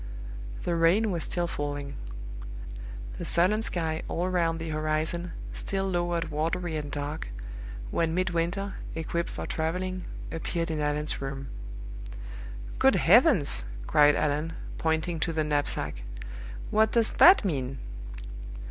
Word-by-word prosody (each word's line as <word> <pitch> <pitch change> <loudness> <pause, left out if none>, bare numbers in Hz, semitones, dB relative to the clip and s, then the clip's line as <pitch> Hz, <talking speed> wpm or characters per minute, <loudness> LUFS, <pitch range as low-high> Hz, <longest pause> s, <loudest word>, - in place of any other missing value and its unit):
The 175 - +1
rain 180 +6 +4
was 170 -3 -1
still 175 -1 0
falling. 145 -3 -3 1.3
The - - -3
sullen 185 +6 +4
sky, 160 -6 0
all 175 +2 0
round 170 -3 +2
the 165 0 -3
horizon, 155 +3 0 0.2
still 195 0 -1
lowered 175 -3 0
watery 165 +2 0
and 150 -1 -3
dark, 145 +2 -3 0.6
when 165 0 +1
Midwinter, 185 +2 0 0.2
equipped 165 +1 -1
for - - -4
traveling, 180 +3 -1 0.3
appeared 165 0 -1
in 155 -1 -1
Allan's 150 0 0
room. 135 0 -4 1.3
"Good - - +6
heavens!" - - +5 0.2
cried 145 - +6
Allan, 150 +2 +1 0.3
pointing 160 +1 +1
to 165 +1 0
the 155 -1 +2
knapsack, 145 - 0 0.7
"what 220 +1 +4
does 230 -2 +4
that 365 - +8
mean?" 135 -6 -1
165 Hz, 120 wpm, -29 LUFS, 150-180 Hz, 1.3 s, that